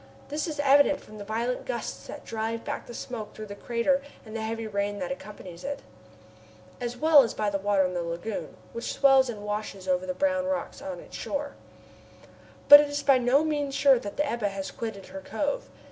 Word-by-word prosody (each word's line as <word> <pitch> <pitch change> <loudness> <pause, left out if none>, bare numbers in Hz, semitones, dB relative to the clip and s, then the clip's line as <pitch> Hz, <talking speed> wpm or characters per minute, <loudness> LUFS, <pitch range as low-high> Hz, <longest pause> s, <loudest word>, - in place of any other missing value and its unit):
This 295 +2 -2
is 305 -2 -5
evident 285 0 +5
from 215 0 -13
the - - -5
violent 230 +4 -2
gusts - - -4
that - - -9
drive 225 +1 -3
back 285 0 -4
the 240 - -8
smoke 225 -4 -6
through 215 - -7
the 200 - -8
crater 245 +6 +1 0.2
and 215 0 -9
the 225 - -2
heavy 225 +1 -3
rain 205 -1 -2
that 270 +4 -3
accompanies 190 -8 -8
it, 280 +1 -4 1.0
as 245 0 -4
well 310 +1 +7
as 235 - -1
by 210 -1 0
the 195 - -1
water 195 -1 +2
in 180 - -2
the 175 - -1
lagoon, 170 +5 -5 0.2
which 235 - -3
swells 270 -2 +5
and 210 -3 -6
washes 210 -2 -4
over 185 0 +1
the 185 - -2
brown 280 +3 +1
rocks 280 0 -3
on 285 -1 -5
its - - -12
shores. 285 0 -3 1.1
But 290 - +13
it 295 0 +1
is 290 0 -2
by 275 -2 +5
no 250 +5 +4
means 290 -3 -1
sure 275 -2 +5
that 205 -3 -7
the 295 - +2
Ebba 235 -6 -1
has 195 -1 -5
quitted 220 -4 -6
her 190 - -6
cove. 290 - -2
235 Hz, 210 wpm, -27 LUFS, 205-280 Hz, 1.1 s, But